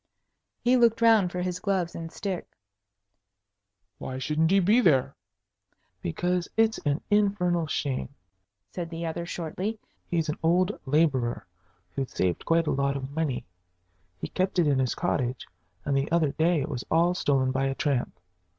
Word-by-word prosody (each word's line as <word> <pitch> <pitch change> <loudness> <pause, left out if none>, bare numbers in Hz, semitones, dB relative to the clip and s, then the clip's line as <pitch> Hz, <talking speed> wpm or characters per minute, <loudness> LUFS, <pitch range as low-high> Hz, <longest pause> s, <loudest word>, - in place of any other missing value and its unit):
He 250 +1 +4
looked 230 -2 +4
round 220 -6 +5
for 180 0 -3
his 180 0 -3
gloves 185 -3 -1
and 165 -1 -6
stick. 190 -3 -4 1.5
"Why 130 - -5
shouldn't 155 +4 +1
he 195 +2 +5
be 210 +7 +4
there?" 140 - +3 0.9
"Because 175 - -1
it's 225 0 +3
an 145 0 -1
infernal 185 -5 +2
shame!" 140 -3 -2 0.6
said 175 -2 -4
the 165 0 -5
other, 170 +1 -4
shortly. 180 +7 -4 0.3
"He's 165 -2 0
an 150 - -3
old 180 +4 +3 0.2
laborer 135 -5 +1 0.5
who'd 135 -2 -3
saved 90 -2 -1
quite 165 0 +3
a - - 0
lot 140 0 0
of 135 0 -6
money. 145 -4 -2 0.7
He - - -4
kept 185 0 -1
it 175 - +4
in 140 -2 +2
his 130 -2 0
cottage, 130 -7 -1 0.4
and 140 - 0
the 135 +3 0
other 165 -4 +2
day 160 +1 +2
it 135 - -2
was 125 -4 -4
all 170 +2 +3
stolen 135 -7 +1
by 135 +1 0
a 135 - -2
tramp. 140 -5 -1
165 Hz, 160 wpm, -27 LUFS, 140-180 Hz, 1.5 s, round